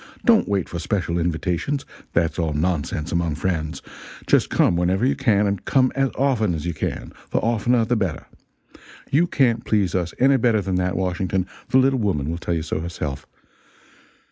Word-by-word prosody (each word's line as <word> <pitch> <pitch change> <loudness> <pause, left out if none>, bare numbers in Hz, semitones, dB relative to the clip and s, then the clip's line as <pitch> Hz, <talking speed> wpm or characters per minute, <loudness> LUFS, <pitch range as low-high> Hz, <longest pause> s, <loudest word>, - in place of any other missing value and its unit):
Don't 230 -3 +5
wait 100 -3 0
for 85 - -5
special 85 -1 -1
invitations 90 - -1 0.3
that's 85 +1 +1
all 80 -2 0
nonsense 75 0 -1
among 85 -3 0
friends. 80 -1 -2 0.4
Just - - +3
come - - +3
whenever 90 +6 +1
you 135 - +2
can, 105 -6 +2
and 100 -1 -1
come 130 +2 +2
as 135 0 +1
often 120 -9 +1
as 80 0 -5
you 85 - -1
can - - -4 0.2
the - - -1
oftener 115 +1 +2
the 120 - +1
better. 95 -8 -2 0.9
You 165 +6 +3
can't 120 -7 +2
please 100 -5 +1
us 90 -2 -2
any 135 +1 +4
better 115 -3 +2
than 95 -1 -1
that, 90 0 -1
Washington; 95 0 -1 0.2
the 130 - +4
little 130 0 +3
woman 80 -9 0
will 85 - -4
tell 85 - -2
you 80 - -2
so 80 - -3
herself. 75 -5 -5
95 Hz, 180 wpm, -22 LUFS, 85-120 Hz, 0.9 s, Don't